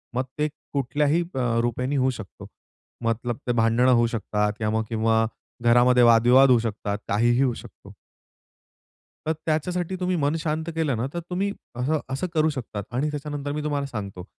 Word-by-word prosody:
मग 130 Hz, -, +1 dB
ते 150 Hz, 0 st, +1 dB, 0.3 s
कुठल्याही 145 Hz, +4 st, +1 dB
अ, 120 Hz, -3 st, +1 dB
रूपेने 125 Hz, +4 st, -1 dB
होऊ 130 Hz, -, +3 dB
शकतो. 100 Hz, -4 st, -10 dB, 0.6 s
मतलब 115 Hz, +1 st, -1 dB
ते -, -, +2 dB
भांडणं 115 Hz, +2 st, +3 dB
होऊ 120 Hz, -, +3 dB
शकतात 105 Hz, -1 st, -1 dB
किंवा 105 Hz, -1 st, -1 dB
मग 110 Hz, -, 0 dB
किंवा 115 Hz, 0 st, +2 dB, 0.4 s
घरामध्ये 120 Hz, +1 st, +5 dB
वाद-विवाद 120 Hz, +3 st, +6 dB
होऊ 125 Hz, -2 st, +6 dB
शकतात. 105 Hz, -2 st, -3 dB
काहीही 120 Hz, +4 st, +2 dB
होऊ 130 Hz, -3 st, +2 dB
शकतो. -, -, -14 dB, 1.3 s
तर 160 Hz, -, +2 dB
त्याच्यासाठी 175 Hz, +3 st, -1 dB
तुम्ही 180 Hz, 0 st, 0 dB
मन 145 Hz, -1 st, +1 dB
शांत 155 Hz, 0 st, -2 dB
केलं 155 Hz, -5 st, 0 dB
ना, 115 Hz, -, -1 dB
तर 175 Hz, -, -2 dB
तुम्ही 190 Hz, +3 st, -1 dB, 0.2 s
असं 140 Hz, +6 st, 0 dB
असं 135 Hz, +7 st, -2 dB
करू 155 Hz, -1 st, +3 dB
शकतात. 120 Hz, -8 st, -5 dB
आणि 135 Hz, +5 st, 0 dB
त्याच्यानंतर 145 Hz, -1 st, -4 dB
मी 150 Hz, +1 st, -3 dB
तुम्हाला 145 Hz, -2 st, -1 dB
सांगतो. 100 Hz, -7 st, -6 dB
125 Hz, 165 wpm, -24 LUFS, 115-150 Hz, 1.3 s, वाद-विवाद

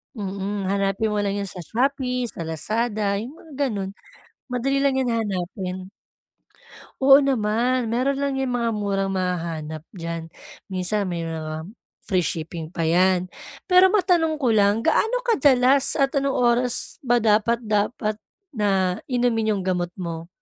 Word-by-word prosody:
Mm, 200 Hz, -1 st, -3 dB
hanapin 200 Hz, +2 st, 0 dB
mo 210 Hz, -, 0 dB
lang 200 Hz, -1 st, 0 dB
'yun 200 Hz, -2 st, -3 dB
sa 180 Hz, -, -8 dB
Shopee, 250 Hz, -, -1 dB
sa 165 Hz, -1 st, -6 dB
Lazada, 210 Hz, +4 st, -1 dB
'yung 250 Hz, +8 st, -7 dB
mga 285 Hz, -4 st, -3 dB
ganun, 195 Hz, -4 st, -3 dB, 0.6 s
madali 265 Hz, +3 st, 0 dB
lang 275 Hz, -1 st, +2 dB
'yan 260 Hz, -2 st, +1 dB, 0.2 s
hanapin. 185 Hz, 0 st, -4 dB, 1.1 s
Oo, 270 Hz, +1 st, +8 dB
naman 245 Hz, -1 st, +1 dB
meron 270 Hz, +3 st, +1 dB
lang 275 Hz, -1 st, -1 dB
'yang 265 Hz, -, -1 dB
mga 235 Hz, -1 st, 0 dB
murang 195 Hz, -2 st, -1 dB
mahahanap 165 Hz, -4 st, -3 dB
dyan, 165 Hz, -2 st, -6 dB, 0.3 s
minsan 195 Hz, +2 st, -1 dB
may 175 Hz, -2 st, -3 dB
mga 160 Hz, -1 st, -4 dB, 0.4 s
free 185 Hz, -3 st, 0 dB
shipping 165 Hz, +1 st, -4 dB
pa 165 Hz, -, -3 dB
'yan, 185 Hz, +1 st, +3 dB, 0.4 s
pero 365 Hz, +1 st, +7 dB
matanong 350 Hz, -5 st, +3 dB
ko 250 Hz, -, +2 dB
lang 210 Hz, 0 st, +3 dB
gaano -, -, +2 dB
kadalas 275 Hz, -, +4 dB
at 275 Hz, 0 st, +1 dB
anong 275 Hz, 0 st, +1 dB
oras 245 Hz, 0 st, +1 dB
ba 240 Hz, 0 st, +3 dB
dapat 220 Hz, +2 st, +2 dB
dapat 215 Hz, 0 st, -1 dB, 0.3 s
na 195 Hz, -6 st, +1 dB
inumin 235 Hz, -4 st, +1 dB
'yung 195 Hz, -, -2 dB
gamot 180 Hz, -1 st, -1 dB
mo? 170 Hz, -2 st, -6 dB
210 Hz, 145 wpm, -23 LUFS, 185-250 Hz, 1.1 s, Oo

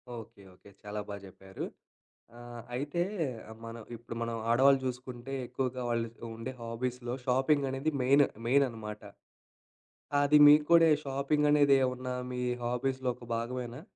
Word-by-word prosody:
Okay. 115 Hz, -2 st, -11 dB
Okay. 100 Hz, -, -18 dB
చాలా 105 Hz, 0 st, -5 dB
బాగా 100 Hz, -1 st, -7 dB
చెప్పారు. 95 Hz, 0 st, -8 dB, 0.7 s
ఆహ్, 120 Hz, 0 st, -9 dB
అయితే 145 Hz, +6 st, -1 dB, 0.6 s
మనం 115 Hz, 0 st, -7 dB, 0.2 s
ఇప్పుడు 115 Hz, 0 st, -9 dB
మనం 115 Hz, 0 st, -2 dB
ఆడవాళ్ళు 135 Hz, +3 st, +5 dB
చూసుకుంటే, 125 Hz, 0 st, -5 dB
ఎక్కువగా 125 Hz, 0 st, -3 dB
వాళ్ళు 115 Hz, -1 st, 0 dB, 0.3 s
ఉండే 115 Hz, +3 st, -5 dB
హాబీస్‌లో 120 Hz, +1 st, -4 dB
షాపింగ్ 135 Hz, +3 st, +2 dB
అనేది 135 Hz, +4 st, -1 dB
మెయిన్ 140 Hz, +3 st, +5 dB, 0.2 s
మెయిన్ 140 Hz, +3 st, +4 dB
అనమాట. 105 Hz, -2 st, -8 dB, 1.2 s
అది 145 Hz, +1 st, +5 dB
మీకు 150 Hz, +1 st, +7 dB
కూడా 170 Hz, -1 st, +8 dB
ఈ -, -, +4 dB
షాపింగ్ 140 Hz, +2 st, +1 dB
అనేది 145 Hz, -2 st, +5 dB
ఏమన్నా 125 Hz, 0 st, -2 dB, 0.2 s
మీ 125 Hz, 0 st, -3 dB, 0.2 s
హాబీస్‌లో 130 Hz, +2 st, -1 dB
ఒక 120 Hz, -, -13 dB
భాగమేనా? 120 Hz, +3 st, -4 dB
125 Hz, 140 wpm, -31 LUFS, 115-135 Hz, 1.2 s, కూడా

